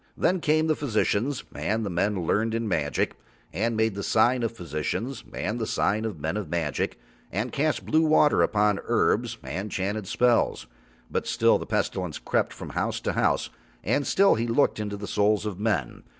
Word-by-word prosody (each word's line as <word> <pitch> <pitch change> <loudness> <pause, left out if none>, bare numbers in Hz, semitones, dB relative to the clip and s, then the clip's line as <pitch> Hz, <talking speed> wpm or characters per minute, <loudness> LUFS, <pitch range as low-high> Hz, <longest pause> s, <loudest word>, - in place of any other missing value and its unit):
Then 185 +1 +2
came 155 +1 +2
the 155 -1 +2
physicians 125 0 0
and 110 +1 -1
the - - -2
men 90 +1 0
learned 110 +6 +1
in 115 -1 -1
magic, 75 -7 0 0.4
and 110 +6 0
made 110 -1 +2
the 100 - -5
sign 120 +5 +3
of 115 - +1
the 115 - -19
physicians 105 - -3
and 110 +5 -3
the 110 - -2
sign 110 +2 0
of 110 -4 -3
the 75 - -14
men 80 +6 -1
of 100 -7 -4
magic 80 -3 -2 0.3
and 110 +7 -2
cast 150 +2 0
blue 155 - +3
water 155 -2 +4
upon 105 -2 +2
herbs - - +1
and 85 +11 -4
chanted 100 +1 -2
spells; 120 - +2 0.5
but - - -2
still - - +3
the - - -7
Pestilence 90 -5 -1
crept - - 0
from - - -8
house - - -1
to - - -1
house - - +1 0.3
and 140 0 0
still 195 +1 +5
he 115 +1 -1
looked 115 0 +2
into 105 -1 -3
the 100 - -6
souls 105 +1 +1
of 100 -3 -4
men. 100 - -1
110 Hz, 195 wpm, -26 LUFS, 95-120 Hz, 0.5 s, still